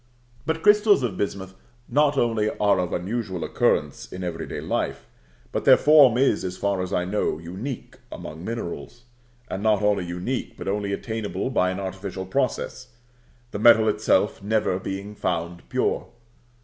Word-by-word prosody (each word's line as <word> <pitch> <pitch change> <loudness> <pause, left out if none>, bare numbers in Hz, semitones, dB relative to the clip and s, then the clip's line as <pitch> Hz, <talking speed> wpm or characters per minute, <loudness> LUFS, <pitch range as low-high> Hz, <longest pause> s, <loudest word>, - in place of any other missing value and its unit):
But 160 0 -1
crystals 210 - +5
of 115 -5 -1
bismuth 95 -2 -3 0.3
not 145 -1 +2
only 115 -4 +2
are 100 -2 +3
of 90 -2 -1
unusual 95 -1 -3
occurrence - - 0
in 90 - -6
every 80 -2 -4
day - - -5
life, - - -2 0.5
but - - -2
their - - +7
form 145 -6 +6
is, 135 +2 +2
as 90 0 -4
far 100 -2 0
as 90 +1 -4
I 90 -2 0
know, 100 -3 -1
unique 95 - -7
among 80 +2 -8
minerals; 115 0 -6 0.4
and 95 - -4
not 105 -1 +2
only 105 -2 +2
unique, 90 +9 -4
but - - -7
only 100 0 -1
attainable 110 +4 -3
by 90 -7 +2
an 95 +1 -3
artificial 95 0 -5
process, 130 +3 -2 0.6
the 100 - -4
metal 110 0 +6
itself - - +2
never 105 -2 0
being 100 +2 -5
found 85 -3 -3
pure. - - 0
100 Hz, 160 wpm, -24 LUFS, 90-120 Hz, 0.6 s, their